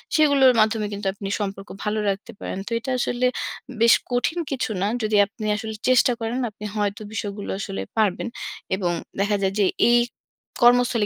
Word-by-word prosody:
সেগুলোর 285 -4 +6
মাধ্যমে 215 -1 +2
কিন্তু 200 -1 -4
আপনি 200 0 -7
সম্পর্ক 195 -1 -4
ভালো 215 0 0
রাখতে 200 +4 -4
পারেন। - - -5
তো - - -6
এটা 260 +3 -4
আসলে 245 +1 0 0.6
বেশ 230 0 +7 0.2
কঠিন 250 +8 0
কিছু 260 -4 -1
না। 200 - +2 0.2
যদি 215 0 +1
আপনি 215 +2 -8
আসলে 220 0 -5 0.2
চেষ্টা 255 0 +5
করেন, 230 +3 -2
আপনি 210 0 -9
হয়তো 205 0 -1
বিষয়গুলো 205 -2 -4
আসলে 95 - -4 0.2
পারবেন। 215 0 +1 0.5
এবং 185 -3 -1 0.3
দেখা 205 +1 +2
যায় 195 0 +1
যে 200 - +5 0.2
এই 240 - +6 0.6
কর্মস্থলে 240 -2 +5
215 Hz, 170 wpm, -23 LUFS, 200-240 Hz, 0.6 s, বেশ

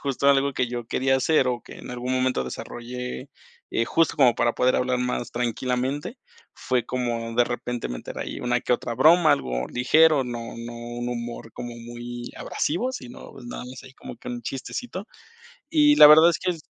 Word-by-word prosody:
justo 140 0 0
algo 140 0 +3
que 125 - -1
yo 120 -1 -5
quería 130 +2 +1
hacer, 135 0 +2
o 120 -1 -2
que - - -12
en - - -9
algún 125 +1 -3
momento 130 - +1
desarrollé, 125 - -6 0.4
eh, 115 - +1
justo, 165 0 +2
como 130 -5 +5
para 120 0 +2
poder 125 0 +2
hablar 125 0 0
más 125 -1 -2
tranquilamente, 125 - -2 0.4
fue 125 -2 -1
como 115 -2 -3
de 120 - +5
repente, 120 0 -4
meter - - -7
ahí - - -5
una 125 0 0
que - - 0
otra 120 -1 -1
broma, 160 +4 +6
algo 65 - -2
ligero, 155 +4 +4
no 120 -2 -5 0.2
no 120 0 -7
un 120 +1 -5
humor 120 -2 -6
como 120 -1 -7
muy 120 +1 -8
abrasivo, 235 - -2
sino, 125 - -9
nada 120 - -7
más, 125 +1 -10
ahí 130 0 -14
como - - -10
que - - -10
un 120 -1 -5
chistecito. 185 - -5 0.6
Y 295 -2 +5
la 150 - +11
verdad 160 +2 +8
es 170 - +1
que - - -1
es 170 -3 -5
125 Hz, 190 wpm, -24 LUFS, 120-140 Hz, 0.6 s, la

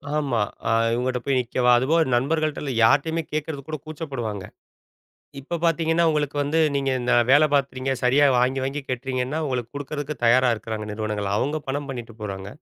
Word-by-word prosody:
ஆமா. 140 -6 0 0.3
அ - - +2 0.2
இவங்கட்ட 125 +1 -1
போய் 135 -1 +1
நிக்கவா? 125 0 +1
அதுபோக 150 +7 +2
நண்பர்கள்ட்ட 155 +4 0
இல்ல 140 - -3
யார்ட்டயுமே 160 +8 +3
கேட்கறதுக்கு 150 -2 -4
கூட 155 - -3
கூச்சப்படுவாங்க. 135 - -5 1.0
இப்போ 150 +6 -4
பார்த்தீங்கன்னா, 165 0 +2
உங்களுக்கு 150 -2 -1
வந்து, 150 +3 +1 0.2
நீங்க 135 -1 0
இந்த 125 +1 0 0.2
வேலை 145 +3 +6
பார்க்கிறீங்க. 135 -1 0
சரியா 130 +4 +4
வாங்கி, 130 +2 +1
வாங்கி 135 +2 -3
கட்டுறீங்கன்னா, 130 +2 -2
உங்களுக்கு 125 -4 -3
குடுக்கறதுக்கு 145 +1 -4
தயாரா 125 +2 +5
இருக்குறாங்க 110 -1 -6
நிறுவனங்கள். 105 -1 -3
அவுங்க 145 +8 0
பணம் 140 +2 -2
பண்ணிட்டு 120 -4 -7
போறாங்க. 100 -2 -5
135 Hz, 155 wpm, -23 LUFS, 120-150 Hz, 1.0 s, வேலை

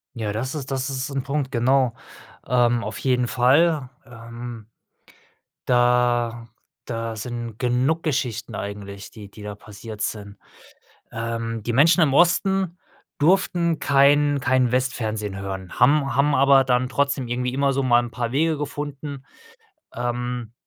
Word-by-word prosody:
Ja, 110 -3 -3
das 125 +6 -3
ist 140 -3 -6
das 135 +1 -2
ist 135 +1 -3
'n 135 -1 -2
Punkt, 140 -1 -3
genau. 130 0 +2 0.5
Ähm, 120 -1 +2
auf 110 - -5
jeden 125 -2 +1
Fall, 140 +4 +3 0.2
ähm 115 -1 -9 1.0
da 120 -1 +2 0.4
da 115 -1 -4
sind 120 0 -6
genug 130 +6 +1
Geschichten 125 -7 -2
eigentlich, 100 -1 -7
die 105 -3 -12
die 105 - -13
da 105 0 -6
passiert 105 +1 -11
sind. 100 -2 -4 0.7
Ähm, 115 -1 -4
die 120 +1 -2
Menschen 165 +7 +5
im 140 -4 +3
Osten 180 +2 +2 0.4
durften 170 0 +2
kein 145 +1 +4
kein 130 -1 +2
Westfernsehen 110 -6 -2
hören, 95 -1 -6
haben 135 0 +3
haben 145 +1 +3
aber 135 0 +5
dann 125 0 +1
trotzdem 140 -2 -1
irgendwie 125 +1 -2
immer 140 0 +1
so 135 - 0
mal 120 -2 +4
'n 120 - -6
paar 120 0 -3
Wege 160 +2 +1
gefunden, 145 -1 -6 0.7
ähm, 120 -1 -3
125 Hz, 140 wpm, -23 LUFS, 115-140 Hz, 1.0 s, Menschen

